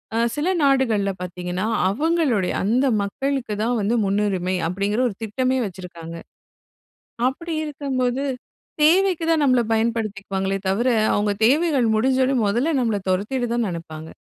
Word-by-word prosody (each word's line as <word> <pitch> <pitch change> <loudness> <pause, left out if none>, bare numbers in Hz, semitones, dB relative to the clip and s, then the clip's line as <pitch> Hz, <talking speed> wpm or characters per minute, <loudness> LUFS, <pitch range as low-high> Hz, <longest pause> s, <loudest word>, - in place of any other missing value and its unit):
அ - - +1 0.2
சில 295 +3 -1 0.2
நாடுகள்ல 230 -8 +2
பாத்தீங்கன்னா, 180 +2 -4 0.2
அவங்களுடைய 290 - +1
அந்த 240 +7 +2 0.2
மக்களுக்கு 265 +1 -2
தான் 240 +1 0
வந்து 225 +4 +1
முன்னுரிமை, 195 -2 0
அப்படிங்கிற 200 +5 -1
ஒரு 200 - -8
திட்டமே 255 +4 0
வச்சுருக்காங்க. 170 -3 -9 1.1
அப்படி 330 +5 -5
இருக்கும்போது, 270 -3 -2 0.6
தேவைக்கு 355 +1 +3
தான் 315 -2 +2
நம்மளை 255 -3 +3
பயன்படுத்திக்குவாங்களே 200 -4 -1
தவிர, 230 +7 +1 0.3
அவங்க 205 0 +1 0.2
தேவைகள் 280 -2 +3
முடிஞ்சோடனே 260 +3 +2
மொதல்ல 250 +10 +1
நம்மள 225 -4 0
தொரத்திட 220 +7 -1
தான் 240 -2 0
நெனப்பாங்க. 160 -2 -7
230 Hz, 120 wpm, -22 LUFS, 195-270 Hz, 1.1 s, தேவைக்கு